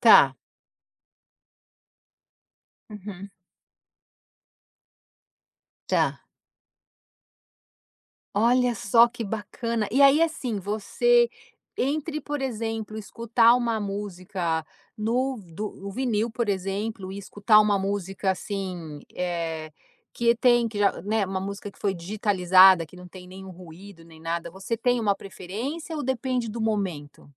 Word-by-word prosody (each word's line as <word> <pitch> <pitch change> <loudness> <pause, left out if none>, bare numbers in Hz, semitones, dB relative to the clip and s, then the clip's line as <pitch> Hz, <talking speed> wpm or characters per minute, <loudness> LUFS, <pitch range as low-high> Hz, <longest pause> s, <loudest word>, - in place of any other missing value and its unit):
Tá. - - +7 2.6
Uhum. 200 -1 -9 2.6
Tá. - - +1 2.1
Olha 245 +3 +3
só 230 +3 +5
que 240 0 -7
bacana, 220 +1 -3
e 275 +2 +4
aí, 280 +3 +7
assim, 275 -9 0
você 465 - +2 0.5
entre, 305 +3 -1
por 290 -2 -4
exemplo, 225 -3 -3
escutar 230 +2 +3
uma 235 -2 0
música 185 -5 -3 0.3
no 250 +4 0 0.2
do 210 +3 -3 0.2
o 200 - -5
vinil, 235 -3 0
por 235 -1 -3
exemplo, 195 +1 -3
e 200 - -6
escutar 205 +2 +4
uma 210 -1 +3
música, 195 0 -1
assim, 180 -6 -5 0.2
eh, 165 -3 -3 0.4
que 235 0 +2
tem 240 -1 +4
que 215 -2 -4
já, 200 -1 +2
né, 210 +1 0
uma 190 0 -3
música 200 +1 -6
que - - -24
foi 195 -2 0
digitalizada, 185 -1 +5
que 180 - -16
não 180 0 -11
tem 180 0 -12
nenhum 190 0 -10
ruído 175 0 -13
nem 165 -1 -16
nada, 170 +1 -3
você 195 +5 -4
tem 245 +1 +1
uma 210 -3 +2
preferência 225 - -6
ou 295 - -3
depende 255 -3 -1
do 230 +1 -5
momento? 185 -11 -3
205 Hz, 120 wpm, -25 LUFS, 190-235 Hz, 2.6 s, Tá